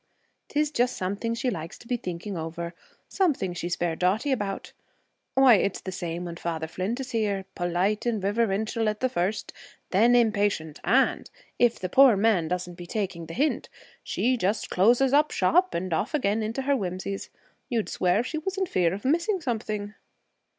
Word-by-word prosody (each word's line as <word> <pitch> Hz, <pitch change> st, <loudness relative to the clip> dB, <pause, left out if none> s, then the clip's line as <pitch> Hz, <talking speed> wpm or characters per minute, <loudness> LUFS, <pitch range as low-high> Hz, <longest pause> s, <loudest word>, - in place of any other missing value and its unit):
'Tis 300 Hz, 0 st, 0 dB
just 250 Hz, -3 st, +1 dB
something 200 Hz, +5 st, -2 dB
she 250 Hz, +1 st, -1 dB
likes 165 Hz, -4 st, -6 dB
to 235 Hz, -, -16 dB
be 245 Hz, -, 0 dB
thinking 185 Hz, -2 st, -5 dB
over 170 Hz, +1 st, -5 dB, 0.3 s
something 290 Hz, -, 0 dB
she's 175 Hz, 0 st, -2 dB
fair 170 Hz, -2 st, -1 dB
dotty 200 Hz, -, +1 dB
about. 205 Hz, -6 st, -3 dB, 0.6 s
Why, 265 Hz, -2 st, +7 dB
it's 195 Hz, 0 st, 0 dB
the 190 Hz, -, -6 dB
same 175 Hz, -1 st, -4 dB
when 170 Hz, -1 st, -6 dB
Father 165 Hz, -2 st, -3 dB
Flint 185 Hz, +9 st, -3 dB
is 260 Hz, -1 st, -5 dB
here. 205 Hz, -4 st, 0 dB
Polite 185 Hz, +6 st, 0 dB
and 230 Hz, -3 st, +1 dB
riverintial 215 Hz, +2 st, 0 dB
at 210 Hz, 0 st, -3 dB
the 255 Hz, -, +1 dB
first, 190 Hz, +2 st, -2 dB, 0.4 s
then 230 Hz, +6 st, +5 dB
impatient, 205 Hz, -9 st, +1 dB
and, -, -, +2 dB, 0.3 s
if 240 Hz, -1 st, +4 dB
the 185 Hz, -, -3 dB
poor 260 Hz, +2 st, +6 dB
man 200 Hz, -6 st, +3 dB
doesn't 180 Hz, 0 st, -4 dB
be 175 Hz, -, -8 dB
taking 185 Hz, -5 st, -3 dB
the 165 Hz, -, -7 dB
hint, 295 Hz, +5 st, 0 dB, 0.3 s
she 255 Hz, +1 st, 0 dB
just 205 Hz, +1 st, -1 dB
closes 240 Hz, +8 st, +4 dB
up 300 Hz, +1 st, +5 dB
shop 365 Hz, +3 st, +2 dB
and 180 Hz, 0 st, -2 dB
off 235 Hz, -, 0 dB
again 220 Hz, -6 st, +1 dB
into 225 Hz, +5 st, -2 dB
her 280 Hz, +1 st, +2 dB
whimsies. 190 Hz, -2 st, -4 dB, 0.4 s
You'd 230 Hz, -5 st, 0 dB
swear 185 Hz, +5 st, +1 dB
she 305 Hz, +5 st, -3 dB
was 385 Hz, +4 st, -4 dB
in 385 Hz, -, +1 dB
fear 180 Hz, -, +1 dB
of 205 Hz, -, -9 dB
missing 340 Hz, +8 st, +2 dB
something?' 215 Hz, -7 st, -3 dB
205 Hz, 180 wpm, -26 LUFS, 180-245 Hz, 0.6 s, Why